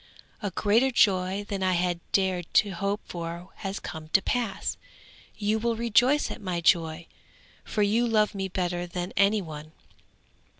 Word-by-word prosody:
'A 205 - -1
greater 225 +6 +3
joy 195 -4 +2
than 200 -1 -3
I 185 -1 +2
had 175 0 0
dared 185 -3 0
to 205 - +5
hope 200 +3 -2
for 170 +1 -6
has 195 0 -4
come 160 -1 -7
to 195 - +6
pass. 240 -5 -1 0.6
You 215 +1 0
will 230 +1 0
rejoice 235 +5 +3
at - - -7
my 180 -3 -2
joy, 165 -1 +2 0.6
for 210 - 0
you 225 +4 +2
love 215 -2 +2
me 195 -1 -3
better 175 -1 -2
than 175 +1 -5
any 200 +1 +3
one.' 155 -1 -9
195 Hz, 160 wpm, -27 LUFS, 175-215 Hz, 0.6 s, to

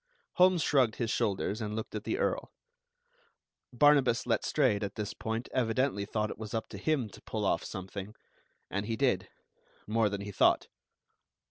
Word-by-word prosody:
Holmes 180 -3 +5
shrugged 130 -7 +3
his 115 -3 -1
shoulders, 100 +2 0
and 105 -1 -3
looked 110 - -5
at 105 -1 -5
the - - -1
Earl. - - -1 1.2
Barnabas 135 -2 +4
Letstrayed 125 -2 +2
at 100 -1 -4
this 105 -2 -3
point 115 +2 -3
evidently 125 -3 +1
thought 105 0 -1
it - - -9
was 110 0 -5
up 110 - -2
to 100 - -8
him 140 -1 +1
to - - -14
pull - - -3
off - - +1
something; 95 +2 -7 0.6
and 100 +2 -2
he 115 - -1
did, 110 -8 +1 0.6
more 110 0 +2
than 100 0 -4
he 100 0 -6
thought. - - +3
110 Hz, 165 wpm, -31 LUFS, 105-130 Hz, 1.2 s, Holmes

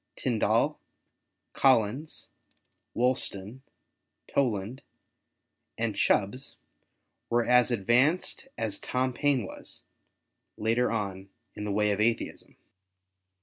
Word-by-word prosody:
Tindal, - - +1 0.7
Collins, 130 +3 +2 0.7
Wolston, 120 -2 -1 0.7
Toland, 120 -2 -1 1.0
and 115 -2 -1
Chubbs 115 +7 +1 0.7
were 120 0 +2
as 125 0 +5
advanced 125 - +2
as 110 -3 -2
Tom 130 0 -1
Payne 140 -5 +1
was, - - -7 0.7
later 115 +3 +1
on, 100 -3 -3 0.2
in 105 - -6
the 105 - -2
way 105 +1 +2
of 100 +1 0
Atheism. 115 +1 -1
115 Hz, 90 wpm, -28 LUFS, 105-130 Hz, 1.0 s, as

